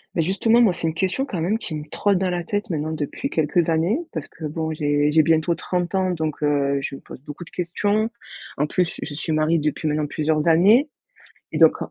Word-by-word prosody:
Bah, - - -1
justement, 195 +7 +3
moi 215 -6 +4
c'est 165 - -2
une 160 - -1
question, 190 +10 -1
quand 200 -11 -4
même, 185 +7 +1
qui 200 -7 -6
me 150 0 -5
trotte 200 +3 +1
dans 185 0 0
la 175 -1 -2
tête, 205 +4 -3
maintenant, 155 -2 -2
depuis 160 - -4
quelques 160 - +1
années. 165 - +2
Parce 160 -3 -5
que 165 - -14
bon, 160 +1 -3
j'ai 145 -1 +1
j'ai 155 +1 +4
bientôt 160 +2 +2
30 180 +1 -2
ans, 185 -1 +1
donc, 155 -3 -3
heu, 140 -1 +1
je 140 - -4
me - - -11
pose - - -12
beaucoup 150 +4 -9
de - - -13
questions. 205 +5 -1 0.5
En 150 - +1
plus, 175 +2 0
je 150 - -5
suis 160 +2 -3
mariée 155 +2 +2
depuis 150 0 -1
maintenant 150 0 0
plusieurs 155 0 0
années 210 - +5 0.6
et - - -2
donc - - +7
165 Hz, 225 wpm, -22 LUFS, 150-185 Hz, 0.6 s, donc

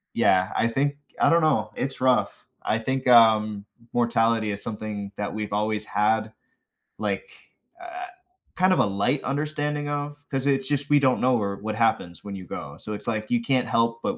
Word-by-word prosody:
Yeah, 95 +1 +3
I 115 - +3
think 140 +4 0 0.2
I - - +5
don't 170 0 +4
know, 110 -9 +2
it's 130 -1 -4
rough. 130 -1 +1 0.2
I 110 - 0
think, 130 +2 -2
um, 110 -3 +5 0.3
mortality 115 -2 +2
is 100 - -5
something 105 -2 -5
that 105 -1 -3
we've 105 -1 -4
always 105 0 -1
had, 110 +1 0 0.6
like, 480 -2 -3 0.5
uh 360 +1 -7 0.5
kind 185 0 +4
of - - +1
a - - +5
light 100 +8 0
understanding 150 +1 -2
of, 145 0 -3
'cause 135 -1 -2
it's 135 -1 +1
just 145 0 -1
we 145 -1 +5
don't 130 -2 +2
know 125 0 +3
where 100 -3 -1
what 110 +1 -4
happens 100 -7 0
when 100 -1 -6
you 95 -1 -8
go. 70 -3 -7
So, 105 - -8
it's, 105 - -7
like, 110 -1 -2
you 120 -1 +2
can't 130 +1 +1
help 115 0 +1
but - - -1
115 Hz, 190 wpm, -25 LUFS, 105-140 Hz, 0.6 s, I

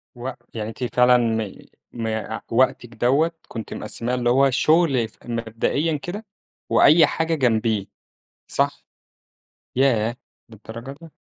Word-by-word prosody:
و 125 +2 -5 0.2
يعني 110 -1 -4
أنتِ 115 +3 -5
فعلًا 125 0 +6
م 110 -4 0 0.4
م 110 -2 -3 0.2
وقتِك 120 0 +2
دوّة 140 +9 +2 0.2
كنت 115 -2 -6
مقسّماه 115 +3 -3
اللي 120 -1 +1
هو 135 +2 +5
الشغل 135 -3 +3
ف - - -27
مبدئيًا 120 +7 -1
كده، 200 +9 -7 0.4
وأي 155 0 +6
حاجة 160 +2 -1
جنبيه، 110 -6 +1 0.6
صح؟ 140 0 -1 0.9
ياه! 120 -3 +2 0.3
للدرجة 115 +4 -9
دي! 165 - -11
125 Hz, 125 wpm, -22 LUFS, 115-140 Hz, 0.9 s, فعلًا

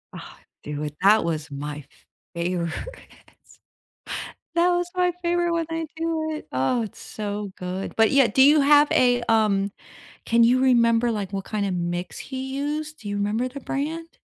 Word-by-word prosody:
Ah, - - -10 0.3
dude 150 0 -5
that 210 +3 +5
was 155 -3 -3
my 145 +1 -6 0.5
favorite. 170 -1 -1 1.8
That 345 +1 +4
was 350 0 0
my 360 -1 +2
favorite 345 0 +1
when 335 -1 0
I 325 0 -2
do 320 -1 -1
it. 305 - -7
Oh, 135 - +1
it's 210 - -9
so 205 -2 -5
good. 185 +1 -5
But, 225 -1 +5
yeah, 275 -1 +5
do 265 - +2
you 295 +3 +7
have 290 +1 +5
a, 245 -1 +4
um, 205 -3 +2 0.6
can 230 0 +4
you 250 +2 +4
remember, 235 -2 +4
like, 205 -3 -4
what 195 -1 -4
kinda 205 -3 -1
mix 175 0 -3
he 265 0 -6
used? 300 +2 -3
Do 210 - -7
you 205 - -2
remember 210 +5 0
the 280 +2 -9
brand? 320 +5 -4
230 Hz, 165 wpm, -24 LUFS, 195-295 Hz, 1.8 s, you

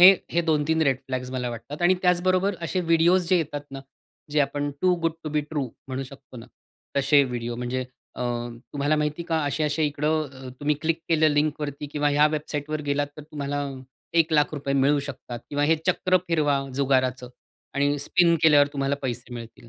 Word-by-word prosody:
हे 185 +2 +11 0.2
हे 170 - +2
2-3 160 +1 +2
red 135 -4 +3
flags 130 -1 -3
मला 125 -2 -2
वाटतात 120 +7 -7
आणि 175 +2 +5
त्याचबरोबर 185 +2 +2
असे 180 +3 -1
व्हिडिओस 170 +2 +4
जे 185 - +5
येतात 150 -3 -2
ना, 135 0 -7 0.5
जे 150 - +2
आपण 145 0 -2
टू 185 -1 +4
गुड 165 - +2
टू - - -2
बि - - +4
ट्रू 150 -3 -1 0.2
म्हणू 130 0 -3
शकतो 130 -1 -13
ना, 115 - -10 0.5
तसे 140 +1 +5
व्हिडिओ, 120 -2 -4
म्हणजे 125 +1 -2 0.3
अ, - - -8 0.5
तुम्हाला 145 +2 +1
माहिती 150 +1 -1
आहे - - -14
का 165 - +1
असे-असे 150 +2 0
इकडं, 145 -3 -2
तुम्ही 150 +1 +2
क्लिक 165 0 +1
केलं 160 -1 +4
लिंकवरती 145 -1 -1
किंवा 145 0 +1
ह्या 145 +1 +5
वेबसाईटवर 150 0 -3
गेलात, 145 0 +1
तर 150 - -8
तुम्हाला 145 -1 -3 0.5
₹100,000 155 -2 +2 0.2
मिळू 140 +2 +3
शकतात 130 -3 -7
किंवा 145 0 +1
हे 160 +2 +4
चक्र 185 0 +3
फिरवा, 150 -4 +2 0.2
जुगाराचं 130 -2 +1 0.5
आणि 145 +1 +1
स्पिन 170 +4 +3
केल्यावर 145 -3 +6
तुम्हाला 140 0 0
पैसे 125 -1 -4
मिळतील. 115 0 -10
145 Hz, 175 wpm, -25 LUFS, 135-160 Hz, 0.5 s, हे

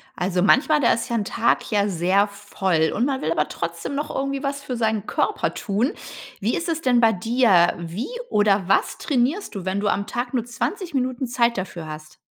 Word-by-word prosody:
Also 180 0 0
manchmal, 300 +8 +4
da 245 - +4
ist 230 +3 -3
ja 235 - -1
'n 215 -3 0
Tag 235 0 0
ja 205 -1 +2
sehr 190 +2 +2
voll 190 -5 -1
und 235 - +1
man 270 -1 -1
will 160 - 0
aber 150 -2 +1
trotzdem 170 +10 -4
noch 295 +1 -3
irgendwie 275 +1 -2
was 280 0 -2
für 250 - -4
seinen 220 -2 0
Körper - - -1
tun. 215 +7 0 0.5
Wie 215 +4 0
ist 335 - -3
es 325 -1 -1
denn 250 -5 +3
bei 225 -2 +5
dir? 200 -3 +3
Wie 170 +7 -4 0.2
oder 205 -3 +2
was 195 - +1
trainierst 285 - 0
du, 190 -2 -5
wenn 190 +1 -1
du 205 - -1
am 200 0 0
Tag 245 +2 -4
nur 235 - 0
20 345 - -4
Minuten 255 0 -1
Zeit 235 -1 +1
dafür 180 -3 -5
hast? 155 0 -9
220 Hz, 210 wpm, -23 LUFS, 190-255 Hz, 0.5 s, bei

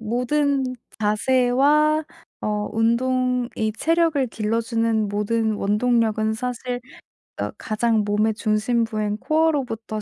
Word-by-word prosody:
모든 265 +5 0 0.3
자세와 260 +8 +3 0.4
어 210 0 -2
운동이 245 0 0
체력을 325 -5 +2
길러주는 225 0 0
모든 220 +2 0
원동력은 220 +1 +1
사실 245 +1 -4 0.6
어 - - -1
가장 220 0 0
몸의 210 +2 +1
중심부인 215 -1 0
코어로부터 265 -9 0
230 Hz, 230 characters per minute, -22 LUFS, 215-255 Hz, 0.6 s, 자세와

